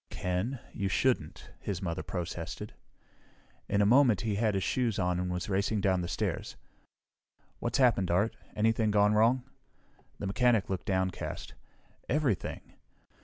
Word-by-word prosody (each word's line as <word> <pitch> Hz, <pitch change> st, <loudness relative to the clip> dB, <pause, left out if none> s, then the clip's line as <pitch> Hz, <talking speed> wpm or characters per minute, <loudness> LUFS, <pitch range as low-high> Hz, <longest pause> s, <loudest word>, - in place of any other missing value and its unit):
"Ken! 90 Hz, +9 st, -2 dB, 0.2 s
You 100 Hz, -, -2 dB
shouldn't!" 95 Hz, -7 st, 0 dB
his 95 Hz, -4 st, -3 dB
mother 85 Hz, -3 st, -3 dB
protested. 85 Hz, +1 st, -5 dB, 1.0 s
In 100 Hz, 0 st, +3 dB
a -, -, +3 dB
moment 120 Hz, -3 st, +5 dB
he 110 Hz, -2 st, -1 dB
had 105 Hz, 0 st, +1 dB
his 95 Hz, -, 0 dB
shoes 120 Hz, -5 st, 0 dB
on 90 Hz, -1 st, +1 dB
and 90 Hz, 0 st, -2 dB
was 90 Hz, 0 st, -3 dB
racing 100 Hz, +2 st, 0 dB
down 95 Hz, -2 st, +2 dB
the 85 Hz, -, -3 dB
stairs. 85 Hz, -, -3 dB, 1.0 s
"What's -, -, -1 dB
happened, 120 Hz, -8 st, +3 dB
Art? 100 Hz, +6 st, +2 dB, 0.2 s
Anything 110 Hz, 0 st, +2 dB
gone 105 Hz, 0 st, +4 dB
wrong?" 115 Hz, +4 st, +4 dB, 0.7 s
The -, -, -5 dB
mechanic 110 Hz, 0 st, +2 dB
looked 95 Hz, -, -3 dB
downcast. 95 Hz, -1 st, -2 dB, 0.6 s
"Everything! 135 Hz, -8 st, -1 dB
100 Hz, 140 wpm, -30 LUFS, 90-115 Hz, 1.0 s, moment